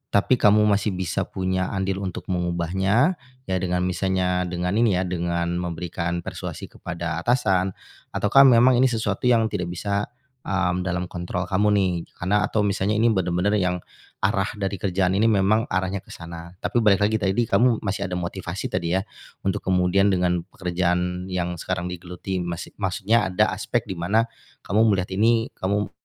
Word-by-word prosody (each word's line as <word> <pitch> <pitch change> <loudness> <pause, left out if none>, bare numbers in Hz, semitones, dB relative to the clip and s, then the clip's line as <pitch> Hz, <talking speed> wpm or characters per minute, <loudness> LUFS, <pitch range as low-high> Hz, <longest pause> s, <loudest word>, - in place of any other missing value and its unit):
tapi 115 +5 +3
kamu 105 +1 +5
masih 105 -1 +2
bisa 90 -2 -2
punya 95 0 -1
andil 95 0 -1
untuk 95 -3 -5
mengubahnya, 95 - +1 0.3
ya - - +2
dengan 90 0 0
misalnya 90 0 0
dengan 90 0 -2
ini 115 -5 +3
ya, 90 - +1
dengan 85 -1 -1
memberikan 85 0 -3
persuasi - - -7
kepada 85 -2 -4
atasan, 95 -3 +1 0.4
ataukah 135 +7 +6
memang 125 0 +6
ini 130 - +5
sesuatu 110 -2 -1
yang 115 -3 +3
tidak 90 - -2
bisa, 100 +4 -2 0.4
mmm, 90 -1 0
dalam 90 0 -2
kontrol 90 +1 -3
kamu 95 +3 +1
nih. 95 -2 +2 0.2
Karena 100 +4 +1
atau 105 - 0
misalnya 100 +1 0
ini 115 +2 +3
benar-benar 95 +1 +1
yang 90 -2 -1 0.4
arah 95 0 +2
dari 100 -2 -3
kerjaan 95 -1 +1
ini 110 - +4
memang 110 +2 +3
arahnya 95 +1 -1
ke - - -23
sana, 85 +1 -9
tapi 120 - +1
balik 105 -3 +4
lagi 110 +2 +2
tadi 100 +3 +1
kamu 115 0 +2
masih 100 0 -2
ada 90 - -4
motivasi 85 -1 -4
tadi 85 +1 0
ya, 95 - +1 0.4
untuk 95 - 0
kemudian 95 +2 +3
dengan 90 -2 +1
pekerjaan 90 0 -1
yang 90 -2 -3
sekarang 90 0 -3
digeluti 90 +2 -5
masi 85 -1 -5
maksudnya 105 +2 +1
ada 90 -1 +2
aspek - - -1
di 95 -3 -6
mana, 100 +7 +2 0.4
kamu 105 - 0
melihat 95 -3 +1
ini, 115 +4 +2
kamu 100 +2 -1
95 Hz, 165 wpm, -24 LUFS, 90-105 Hz, 0.4 s, ataukah